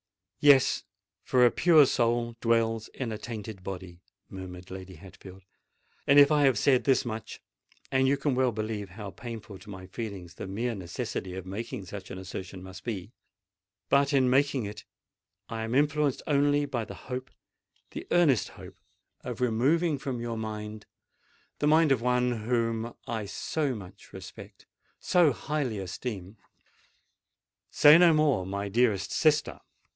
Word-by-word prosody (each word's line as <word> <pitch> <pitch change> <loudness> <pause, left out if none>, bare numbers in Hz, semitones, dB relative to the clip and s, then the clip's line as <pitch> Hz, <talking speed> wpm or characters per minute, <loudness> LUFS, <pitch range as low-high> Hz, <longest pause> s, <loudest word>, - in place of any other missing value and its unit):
"Yes—for 130 -2 +3
a 120 - +5
pure 160 -5 +6
soul 120 -1 0
dwells 115 -1 +1
in 125 -4 -3
a 110 - -5
tainted 110 -4 -7
body," 90 -2 -7 0.3
murmured 90 -1 -9
Lady 95 0 -8
Hatfield; 95 +2 -13 0.6
"and 140 - +6
if 145 +1 +8
I 150 -1 +4
have 130 -5 +4
said 130 +2 +3
this 135 -2 +2
much—and 120 +3 -4
you 140 +1 +3
can 140 0 0
well 130 -1 +2
believe 110 -2 -4
how 100 +1 -8
painful 110 -4 -8
to 100 +3 -14
my 95 -2 -8
feelings 95 -3 -7
the 90 - -7
mere 115 +5 -2
necessity 90 -1 -5
of 95 -1 -6
making 100 +1 -6
such 95 +1 -8
an 95 - -7
assertion 95 0 -7
must 95 0 -10
be,—but 100 +4 -3
in 130 -2 +4
making 135 -3 +2
it, 105 0 -7 0.6
I 115 -1 -5
am 115 +2 -2
influenced 145 -1 +1
only 145 0 +2
by 120 -5 -3
the - - -9
hope—the 130 0 -10
earnest 155 - +3
hope - - -13 0.4
of 125 -1 -6
removing 140 +7 +2
from 135 -3 -4
your 115 -1 -4
mind—the 110 +6 -8
mind 155 0 +5
of 130 -4 +3
one 125 0 +2 0.2
whom 115 -1 -1
I 110 -3 -4
so 140 +5 -2
much 95 -4 -12
respect—so 175 -5 -2
highly 145 -6 -2
esteem——" 95 +1 -6 1.3
"Say 150 +3 +7
no 175 -1 +7
more, 145 - +2
my 100 +1 -3
dearest 110 -2 +1
sister!" 155 -2 +2
115 Hz, 140 wpm, -28 LUFS, 100-135 Hz, 1.3 s, if